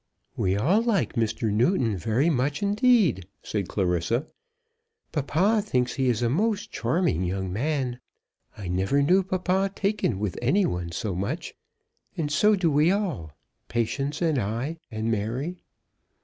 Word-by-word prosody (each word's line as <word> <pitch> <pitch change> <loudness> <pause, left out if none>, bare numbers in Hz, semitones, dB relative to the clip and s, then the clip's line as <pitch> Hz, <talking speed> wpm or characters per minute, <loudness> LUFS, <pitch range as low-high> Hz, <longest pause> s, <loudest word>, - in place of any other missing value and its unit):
"We 95 +1 +1
all 175 - +3
like 230 -6 +1
Mr. 115 -2 0
Newton 115 - +2
very 115 - +1
much 145 +4 0
indeed," 205 - +3 0.2
said 100 -4 -2
Clarissa. 95 - 0 0.9
"Papa 175 +9 +2
thinks 125 - 0
he 135 -2 0
is 120 -1 0
a - - +3
most 210 - 0
charming 160 - 0
young 95 0 -2
man. 130 +1 -1 0.6
I 100 - -6
never 95 +11 +1
knew 185 +7 +4
papa 190 +1 0
taken 200 - 0
with 100 -2 -3
any 180 +11 +3
one 90 - -3
so 95 +3 -3
much. 95 +3 -3 0.6
And 150 -3 -1
so 210 +9 +4
do 175 -5 +1
we 150 +3 +4
all, 175 - -1 0.3
Patience 135 +7 -1
and 155 -5 +2
I, 120 +10 -2
and 110 0 -2
Mary." 120 - -2
135 Hz, 145 wpm, -26 LUFS, -, 0.9 s, knew